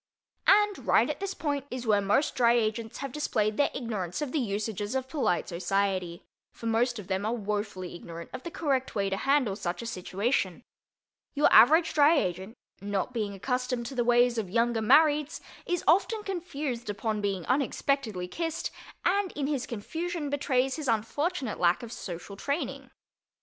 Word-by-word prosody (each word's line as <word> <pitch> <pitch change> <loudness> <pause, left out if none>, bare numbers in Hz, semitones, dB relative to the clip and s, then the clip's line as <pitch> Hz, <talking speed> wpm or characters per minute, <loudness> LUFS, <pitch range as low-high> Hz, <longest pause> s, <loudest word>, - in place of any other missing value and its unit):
And 415 0 +4
right - - +5
at - - -7
this 390 -1 -3
point 285 -3 -2
is 250 -1 -5
where 210 -2 +3
most 205 +9 +2
Dry 235 -1 +4
Agents 225 -1 -1
have 275 -1 -5
displayed 220 -7 0
their 285 - +3
ignorance 205 -9 -4
of 295 -4 -3
the 310 - 0
usages 210 -1 -2
of 260 -1 -1
polite 265 - 0
society, 185 0 -1 0.3
for - - -11
most 235 +2 +1
of 210 - -7
them 190 +1 -2
are 220 +3 0
wofully 205 -4 -3
ignorant 170 -1 -9
of - - -5
the 340 - -6
correct 275 -8 -1
way 195 -2 0
to - - +1
handle 270 -5 +2
such 180 +2 -4
a - - -6
situation. 195 0 -1 0.7
Your 290 - +4
average 320 +7 +7
Dry 305 +2 +5
Agent, 190 0 -2 0.2
not 200 +4 -2
being 210 -4 -2
accustomed 250 +3 -2
to 270 - -6
the 245 - +2
ways 240 0 +4
of 200 -5 -4
Younger 230 +2 +1
Marrieds, 300 +5 +4 0.3
is 355 -1 -1
often 420 +6 +3
confused 295 - -4
upon 210 +1 -2
being 195 -4 -2
unexpectedly 255 -7 0
kissed, 325 - -3 0.3
and 385 +1 +2
in 285 - -2
his 280 -3 -1
confusion 320 +7 -4
betrays 265 -1 +1
his 305 -3 -4
unfortunate 250 - -1
lack 175 +5 +3
of 230 - -7
social 180 -1 -7
training. 280 +10 -3
240 Hz, 170 wpm, -28 LUFS, 205-285 Hz, 0.7 s, average